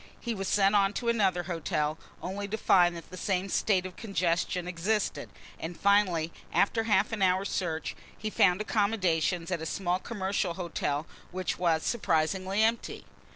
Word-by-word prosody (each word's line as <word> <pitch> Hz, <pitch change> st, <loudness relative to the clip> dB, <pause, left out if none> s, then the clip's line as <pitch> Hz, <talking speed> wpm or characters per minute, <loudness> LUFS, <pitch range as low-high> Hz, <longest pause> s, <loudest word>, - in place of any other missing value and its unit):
He 235 Hz, -, -3 dB
was 195 Hz, -3 st, -4 dB
sent 200 Hz, 0 st, +3 dB
on 200 Hz, -1 st, +3 dB
to 235 Hz, +1 st, -1 dB
another 195 Hz, -6 st, +2 dB
hotel, 160 Hz, -3 st, -2 dB, 0.2 s
only 200 Hz, +2 st, -4 dB
to 215 Hz, +2 st, -3 dB
find 175 Hz, -4 st, +4 dB
that 165 Hz, -, -11 dB
the 185 Hz, -, -8 dB
same 190 Hz, 0 st, -1 dB
state 190 Hz, -1 st, +1 dB
of 185 Hz, -1 st, -7 dB
congestion 180 Hz, -4 st, -1 dB
existed, 190 Hz, +5 st, -1 dB, 0.3 s
and 165 Hz, +1 st, -6 dB
finally 185 Hz, -5 st, +3 dB, 0.2 s
after 225 Hz, +2 st, +2 dB
half 210 Hz, -1 st, +2 dB
an 220 Hz, -3 st, -3 dB
hour's 190 Hz, +1 st, +2 dB
search 165 Hz, -4 st, -2 dB, 0.2 s
he 215 Hz, 0 st, -4 dB
found 185 Hz, 0 st, +3 dB
accommodation 190 Hz, -6 st, +1 dB
at 170 Hz, -3 st, -1 dB
a -, -, -4 dB
small 180 Hz, 0 st, -1 dB
commercial 190 Hz, -4 st, -2 dB
hotel 165 Hz, -4 st, -2 dB, 0.2 s
which 185 Hz, -1 st, -3 dB
was 165 Hz, -3 st, +2 dB
surprisingly 190 Hz, 0 st, +1 dB
empty. 230 Hz, +1 st, -1 dB
185 Hz, 160 wpm, -29 LUFS, 175-205 Hz, 0.3 s, find